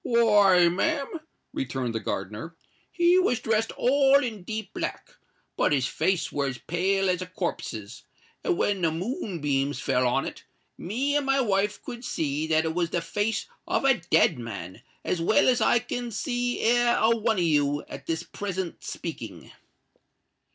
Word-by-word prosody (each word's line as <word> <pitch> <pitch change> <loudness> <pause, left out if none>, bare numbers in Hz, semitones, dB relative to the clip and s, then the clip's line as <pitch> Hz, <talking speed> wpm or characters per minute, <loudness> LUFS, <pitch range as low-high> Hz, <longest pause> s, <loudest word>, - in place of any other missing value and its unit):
"Why, 205 -6 +5
ma'am," 280 - -1 0.3
returned 125 -2 -3
the 115 - -1
gardener, 105 - -5 0.4
"he 345 +1 +4
was 250 -11 +2
dressed 220 0 0
all 275 +2 +4
in 220 -5 -4
deep 215 +1 -5
black; - - -4 0.4
but - - +2
his 135 -3 +2
face 170 +6 0
were 140 -1 -1
as 130 -1 -4
pale 190 +7 0
as 180 -1 +1
a 185 - -4
corpse's; 125 - -5 0.4
and 365 -4 +1
when 200 -2 0
the 165 - +3
moonbeams 155 - -2
fell 125 0 +1
on 120 - +1
it, - - -7 0.3
me 260 +10 -1
and 290 - +2
my 270 0 +3
wife 210 -3 0
could 240 0 -7
see 155 - -2
that 160 0 +2
it 160 - -1
was 170 0 0
the 175 - 0
face 205 +6 -1 0.2
of - - 0
a 265 -8 +4
dead 150 - +4
man 100 -4 -7 0.2
as 175 - -1
well 195 +3 +3
as 250 -1 +3
I - - +4
can 240 +1 -3
see 245 +3 -2
e'er 240 +1 +3
a 230 +1 +4
one 225 -1 0
of 180 - +2
you 145 -2 +2
at - - -9
this 165 -1 -1
present 190 -3 -5
speaking." - - -7
190 Hz, 170 wpm, -26 LUFS, 155-235 Hz, 0.4 s, Why